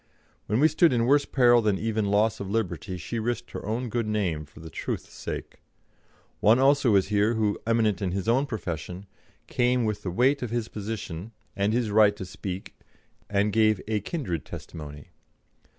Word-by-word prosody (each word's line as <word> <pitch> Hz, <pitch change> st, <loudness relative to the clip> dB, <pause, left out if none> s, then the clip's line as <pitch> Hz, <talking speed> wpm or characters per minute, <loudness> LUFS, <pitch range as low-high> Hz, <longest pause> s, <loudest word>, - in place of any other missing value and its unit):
When 110 Hz, +3 st, +1 dB
we 155 Hz, -, +6 dB
stood 160 Hz, 0 st, +4 dB
in 115 Hz, -1 st, +2 dB
worse 140 Hz, +3 st, +4 dB
peril 120 Hz, -3 st, +5 dB
than 105 Hz, -3 st, +1 dB
even 110 Hz, 0 st, -1 dB
loss 110 Hz, +2 st, +2 dB
of 100 Hz, -, -5 dB
liberty, 95 Hz, -4 st, -2 dB
she 90 Hz, +7 st, -4 dB
risked 120 Hz, +1 st, -3 dB
her -, -, -6 dB
own 115 Hz, +4 st, -2 dB
good 115 Hz, -1 st, -2 dB
name 90 Hz, -8 st, -1 dB
for 70 Hz, -, -17 dB
the 80 Hz, 0 st, -10 dB
truth's -, -, -5 dB
sake. -, -, -7 dB, 0.8 s
One 110 Hz, +3 st, +5 dB
also 135 Hz, -4 st, +4 dB
is 95 Hz, -1 st, +3 dB
here 105 Hz, +2 st, +2 dB
who, 105 Hz, -2 st, 0 dB
eminent 110 Hz, -4 st, +2 dB
in 95 Hz, -2 st, -1 dB
his 95 Hz, +1 st, -3 dB
own 130 Hz, +5 st, +3 dB
profession, 90 Hz, -, -5 dB, 0.4 s
came 125 Hz, -1 st, +1 dB
with 105 Hz, -1 st, -2 dB
the 95 Hz, -, -3 dB
weight 130 Hz, +10 st, +2 dB
of 125 Hz, -, -3 dB
his 115 Hz, -1 st, -2 dB
position 105 Hz, -2 st, -6 dB, 0.2 s
and 100 Hz, +1 st, +1 dB
his 115 Hz, -2 st, 0 dB
right 105 Hz, -1 st, +5 dB
to 95 Hz, -, -6 dB
speak, 95 Hz, +1 st, -6 dB, 0.6 s
and 100 Hz, 0 st, +1 dB
gave 110 Hz, -2 st, +4 dB
a 110 Hz, -1 st, 0 dB
kindred 100 Hz, -, -3 dB
testimony. 75 Hz, 0 st, -9 dB
110 Hz, 180 wpm, -26 LUFS, 95-120 Hz, 0.8 s, we